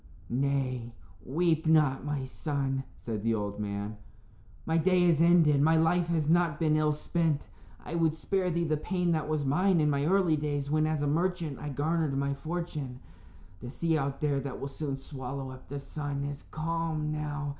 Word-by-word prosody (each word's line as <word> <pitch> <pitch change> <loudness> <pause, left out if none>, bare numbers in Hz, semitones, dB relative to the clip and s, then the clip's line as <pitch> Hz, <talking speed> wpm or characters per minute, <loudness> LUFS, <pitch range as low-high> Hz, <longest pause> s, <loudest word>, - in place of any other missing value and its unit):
"Nay, 130 -3 -1 0.3
weep 160 - +1
not, 150 -4 +4
my 145 -2 -2
son," 135 -1 -2
said 110 -3 -4
the 115 +1 +1
old 105 -1 -3
man. 105 +1 -4 0.7
"My 165 0 +2
day 180 +1 +4
is 165 -3 +4
ended; 165 -4 +5
my 160 +2 +5
life 170 +2 +3
has 160 -3 0
not 165 -2 +3
been 155 -2 +3
ill 155 0 +3
spent. 155 0 0 0.4
I - - -6
would 165 -2 +2
spare 185 +2 0
thee 170 0 0
the 155 -2 +1
pain 175 +2 0
that 155 -2 0
was 155 -2 0
mine 180 +6 +3
in 150 -1 +3
my 140 +1 +1
early 180 -4 +3
days, 145 -1 -2
when, 155 0 +3
as 155 -2 0
a - - +1
merchant, 165 -1 0
I 150 - -5
garnered 150 0 0
my 140 0 0
fortune. 150 -3 -4 0.6
The 125 - -7
sea 165 +4 0
out 140 -2 -1
there 145 -2 +1
that 135 -1 -5
will 140 - -3
soon 140 -1 -4
swallow 135 -1 -6
up 130 0 -12
the 145 - -5
sun 140 0 -4
is 140 0 -5
calm 160 -1 -2
now. 150 -1 -3
150 Hz, 190 wpm, -30 LUFS, 140-165 Hz, 0.7 s, ended